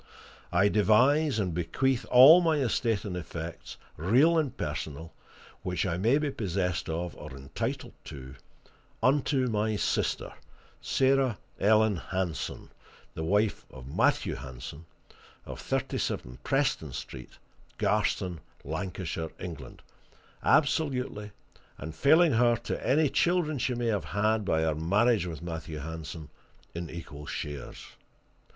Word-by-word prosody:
I 95 +3 +4
devise 125 +8 +4
and 95 -5 -1
bequeath 115 +10 0
all 140 +8 +9
my 165 -3 +2
estate 115 -5 0
and 95 -3 -4
effects, 85 -1 -7 0.2
real 125 - +4
and 155 -6 0
personal, 80 +2 -5 0.5
which 90 -1 -2
I 90 -2 -1
may 115 +9 +3
be 150 -1 -1
possessed 90 - -2
of 85 +1 -3
or 75 - -9
entitled 65 0 -4
to, 65 -3 -9 0.7
unto 135 -1 +2
my 110 -1 0
sister, - - -1 0.5
Sarah 135 -4 +2 0.2
Ellen 110 -1 +4
Hanson, 90 -1 -4 0.4
the 80 - -4
wife 105 +5 +1
of 65 +2 -11
Matthew - - +2
Hanson, 65 +5 -8 0.6
of - - -8
37 - - -2
Preston 135 - 0
Street, 65 0 -8 0.4
Garston, 90 -3 0 0.2
Lancashire, 80 +1 -4
England, 80 -8 -8 0.6
absolutely, 130 -8 +1 0.5
and 80 +2 -7
failing 155 - +5
her 120 +1 +4
to 120 - -5
any 150 +3 +4
children 155 +1 +1
she 125 +1 0
may 120 0 -2
have 100 -7 -1
had 105 +5 0
by 80 -4 +1
her 80 -1 +1
marriage 100 +6 +2
with 80 -1 -7
Matthew 80 -2 -5
Hanson, 80 0 -7 0.4
in 85 0 -5
equal 75 -3 -9
shares. 75 -1 -6
100 Hz, 125 wpm, -29 LUFS, 80-125 Hz, 0.7 s, all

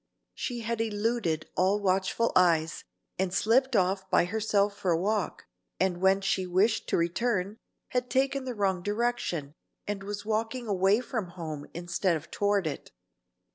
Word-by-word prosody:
She 240 -2 -4
had 230 0 -2
eluded 210 -6 -1
all 190 +3 +3
watchful 195 +3 +1
eyes, 165 -3 +3 0.4
and 190 -1 +1
slipped 240 +7 +2
off 190 0 +1
by - - +4
herself 205 0 +1
for 200 -2 -2
a 165 -1 +3
walk, 205 +2 -1 0.3
and 185 -1 +1
when 190 +1 +4
she 190 -1 0
wished 195 +5 +2
to - - +2
return, 195 +3 0 0.3
had 250 -1 -1
taken 270 +1 +1
the 250 -2 -4
wrong 190 -3 0
direction, 205 -8 -1 0.3
and 205 -1 -3
was 205 +1 -5
walking 225 +3 -1
away 200 +1 +3
from 225 -6 -3
home 160 -5 -6
instead 175 0 0
of 155 - -13
toward 205 -2 +1
it. 145 -3 -4
200 Hz, 155 wpm, -29 LUFS, 180-225 Hz, 0.4 s, by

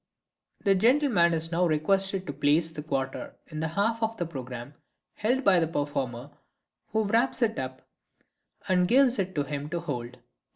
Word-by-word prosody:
The 195 - +4
gentleman 230 - +4
is 165 +1 -3
now 175 +1 +2
requested 190 +5 +1
to 145 - -4
place 150 +4 +2
the 155 - -6
quarter 135 -3 -3
in 155 -2 -7
the 160 - 0
half 210 +7 0
of 225 0 -1
the 175 - -1
programme 130 -3 -7 0.4
held 250 +5 0
by 190 -5 +5
the 165 - +1
performer, 140 -4 -3 0.6
who 220 +1 0
wraps 230 +4 +1
it 225 -1 0
up 130 0 -6 0.8
and 180 -2 +3
gives 255 0 +4
it 185 -1 -2
to 145 - +1
him 145 +1 -5
to 170 +2 -2
hold. 125 -7 -5
170 Hz, 170 wpm, -27 LUFS, 145-205 Hz, 0.8 s, by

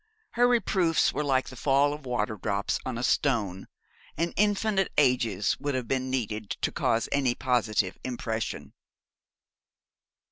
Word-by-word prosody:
Her 245 +1 +3
reproofs 190 -9 +2
were 150 - -1
like 135 -2 +1
the 130 - -10
fall 140 +2 +2
of 150 -3 -9
waterdrops 105 -4 -1
on 125 -3 -3
a 120 - -3
stone, 110 -9 0 0.5
and 170 +1 -1
infinite 205 -1 +1
ages 120 -8 +2
would 145 -2 -2
have 125 -2 -3
been 130 -1 -1
needed 110 -5 -3
to - - -2
cause 115 0 0
any 130 -4 +1
positive 110 -7 0
impression. 115 -3 -4
130 Hz, 135 wpm, -27 LUFS, 110-145 Hz, 0.5 s, Her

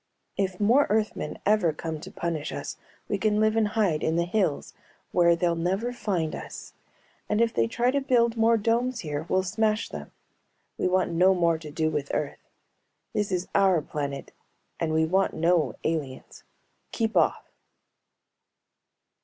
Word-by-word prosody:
If 190 -2 -2
more 235 +8 +4
Earthmen 210 -7 -1
ever 205 -5 +3
come 160 0 -5
to - - -9
punish 165 -3 -3
us, - - -5 0.3
we - - -1
can 210 -1 +2
live 215 0 +3
and 220 -1 +3
hide 200 -8 +1
in 160 - 0
the 170 0 +1
hills 175 -5 -1 0.4
where 170 -1 +4
they'll 170 0 +1
never 190 +9 -1
find 185 -9 -2
us. - - -8 0.6
And 210 - +1
if 230 -1 +2
they 115 - +2
try 240 - +1
to 280 +1 0
build 240 -3 +2
more 230 0 +4
domes 235 +3 0
here 150 0 -4
we'll 185 0 +2
smash 215 +3 0
them. - - -8 0.6
We - - 0
want 185 -1 +1
no 185 +3 +4
more 170 -2 +2
to 155 -2 -9
do 155 +1 -1
with 145 -2 -3
Earth. 145 - -3 0.7
This 205 -1 -1
is 180 0 -1
our 190 -3 +4
planet 140 -2 -5 0.5
and 165 -2 -1
we 160 0 +3
want 190 +4 +1
no 170 -1 +2
aliens. 150 -5 -4 0.5
Keep 225 -1 -1
off! - - +1
185 Hz, 160 wpm, -26 LUFS, 160-215 Hz, 0.7 s, more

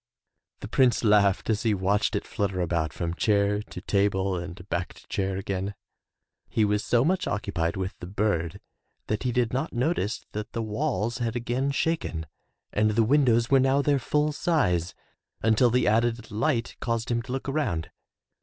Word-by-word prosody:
The - - -5
Prince 125 -3 +3
laughed 105 -3 +4
as 110 -2 +1
he 110 -3 +2
watched 100 +2 +1
it - - -2
flutter 100 -2 -2
about 85 -3 0
from 85 +4 -3
chair 105 +1 +2
to - - -9
table 100 -1 +1
and 90 +1 -7
back 85 -1 -3
to - - -17
chair 95 -1 -1
again. 95 +1 -3 0.7
He 110 - +2
was 105 0 +1
so 120 +1 +2
much 185 +3 +1
occupied 90 -4 -1
with 95 0 -2
the 85 - -7
bird 100 -3 -1 0.5
that 105 - -2
he 125 - 0
did 120 -1 0
not 130 - -2
notice 120 - -1
that 105 +1 -6
the 115 - -2
walls 120 0 -1
had 115 -1 -1
again 120 +3 -1
shaken 140 - -1 0.5
and 110 +1 +3
the 110 +2 +3
windows 120 -2 +3
were 135 - +6
now 135 +2 +3
their 145 -1 +2
full 150 +3 +1
size, 90 - 0 0.5
until 115 +2 +4
the 125 +2 +2
added 115 +1 +1
light 115 +2 -1
caused 115 0 -2
him 120 0 +1
to 125 +2 -9
look 135 +1 -3
around. 110 - -1
110 Hz, 175 wpm, -26 LUFS, 95-125 Hz, 0.7 s, were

